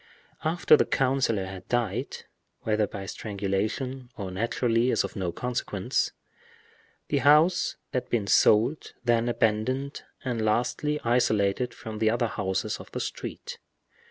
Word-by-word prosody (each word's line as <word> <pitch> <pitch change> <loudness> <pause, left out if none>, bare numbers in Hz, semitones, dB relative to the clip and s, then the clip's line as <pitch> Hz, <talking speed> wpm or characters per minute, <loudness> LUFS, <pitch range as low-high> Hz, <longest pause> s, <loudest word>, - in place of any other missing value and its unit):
After 160 0 +5
the - - +3
councilor 130 -7 +1
had 95 -1 -9
died—whether 110 -2 -2
by 95 0 -7
strangulation 110 +7 -3
or 95 -3 -5
naturally 115 +4 +1
is - - +2
of - - -6
no 95 -4 -2
consequence—the 105 -2 -4
house 155 +5 +4 0.2
had 125 - -2
been 115 -4 0
sold, 110 +8 +3
then 120 0 +2
abandoned, 120 +5 0 0.2
and 120 -3 -1
lastly 125 +7 0
isolated 115 -1 +1
from 110 -1 -7
the 110 0 +3
other 120 +1 +1
houses 95 -1 -2
of - - -12
the - - -2
street. - - -6
115 Hz, 125 wpm, -27 LUFS, 105-125 Hz, 0.2 s, After